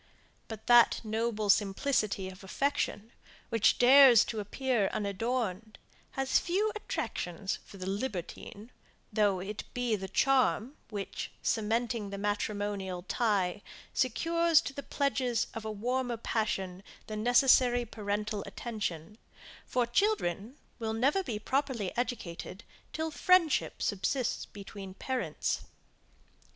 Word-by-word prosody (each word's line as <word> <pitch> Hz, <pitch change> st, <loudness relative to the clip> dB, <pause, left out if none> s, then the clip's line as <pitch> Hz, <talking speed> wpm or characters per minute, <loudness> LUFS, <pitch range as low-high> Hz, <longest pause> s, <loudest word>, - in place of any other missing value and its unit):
But 220 Hz, -1 st, -8 dB
that 240 Hz, -1 st, +6 dB
noble 220 Hz, -1 st, -1 dB
simplicity 205 Hz, -1 st, 0 dB
of 190 Hz, +1 st, -10 dB
affection, 230 Hz, -1 st, -1 dB, 0.4 s
which 225 Hz, -2 st, +3 dB
dares 255 Hz, -2 st, +8 dB
to 220 Hz, -, -4 dB
appear 215 Hz, 0 st, 0 dB
unadorned, 215 Hz, 0 st, -2 dB, 0.4 s
has 270 Hz, 0 st, +2 dB
few 400 Hz, +5 st, 0 dB
attractions 190 Hz, -, -3 dB
for 200 Hz, -, -13 dB
the 185 Hz, -, -6 dB
libertine, 205 Hz, +1 st, -5 dB, 0.4 s
though 205 Hz, -3 st, +2 dB
it 200 Hz, +3 st, -5 dB
be 245 Hz, -3 st, +1 dB
the 190 Hz, -2 st, -5 dB
charm, 255 Hz, -, +2 dB
which, 205 Hz, -3 st, -5 dB
by -, -, -29 dB
cementing 225 Hz, -1 st, 0 dB
the 200 Hz, -, -5 dB
matrimonial 205 Hz, -2 st, -2 dB
tie, 205 Hz, -3 st, 0 dB, 0.3 s
secures 330 Hz, +6 st, +3 dB
to 275 Hz, -, -6 dB
the 280 Hz, -, -5 dB
pledges 265 Hz, -4 st, 0 dB
of 225 Hz, -1 st, -6 dB
a 220 Hz, -, -2 dB
warmer 245 Hz, +3 st, -1 dB
passion 195 Hz, -5 st, -2 dB, 0.2 s
the 215 Hz, -, -6 dB
necessary 245 Hz, +1 st, +4 dB
parental 210 Hz, -1 st, -3 dB
attention; 210 Hz, -4 st, -5 dB, 0.5 s
for 250 Hz, -1 st, +1 dB
children 240 Hz, -, 0 dB, 0.2 s
will 220 Hz, -1 st, -2 dB
never 270 Hz, +11 st, +2 dB
be 235 Hz, -, -4 dB
properly 260 Hz, -3 st, -1 dB
educated 215 Hz, -5 st, -4 dB, 0.3 s
till 320 Hz, 0 st, -3 dB
friendship 345 Hz, -1 st, +2 dB
subsists 225 Hz, +5 st, -1 dB
between 195 Hz, -1 st, -9 dB
parents. 260 Hz, +3 st, -2 dB
220 Hz, 115 wpm, -31 LUFS, 200-255 Hz, 0.5 s, dares